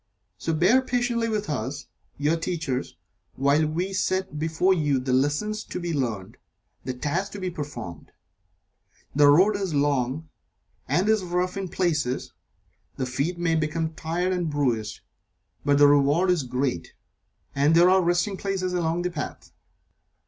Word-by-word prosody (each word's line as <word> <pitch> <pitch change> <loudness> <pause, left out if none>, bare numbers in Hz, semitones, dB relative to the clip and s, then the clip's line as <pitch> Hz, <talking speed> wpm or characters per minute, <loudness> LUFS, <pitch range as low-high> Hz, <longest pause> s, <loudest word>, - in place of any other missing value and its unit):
So 165 - -2
bear 185 +11 +4
patiently 245 -2 0
with 210 -1 -2
us, 140 -1 -3 0.3
your 150 +3 +1
Teachers, 165 -6 -3 0.4
while 145 +3 +2
we 175 +5 -2
set 185 -4 -1
before 160 +4 +2
you 145 -6 +1
the 130 0 -1
lessons 150 +12 0
to - - -5
be 170 -1 -3
learned 115 -9 -3 0.5
the 130 - -4
tasks 170 +10 -2
to 205 - -6
be 185 -1 -3
performed. 120 - -7 1.0
The 145 0 +6
road 185 +9 +5
is 195 -6 -2
long, 140 +1 0 0.6
and 185 +4 +1
is 220 -2 +3
rough 180 +1 -1
in 195 -1 -3
places 155 -8 -1 0.6
the 130 - -1
feet 140 +8 -2
may 170 -1 +1
become 160 +1 -1
tired 175 +4 -1
and 175 -3 -1
bruised, 120 -8 -1 0.6
but 145 -1 +3
the 145 - +7
reward 145 +6 +4
is 175 -3 +2
great, 125 -8 -2 0.6
and 145 +4 +3
there 175 +2 +6
are 190 0 +5
resting 175 +3 +1
places 190 -2 -2
along 170 0 0
the 180 - -1
path. 150 -5 -6
160 Hz, 150 wpm, -25 LUFS, 140-185 Hz, 1.0 s, the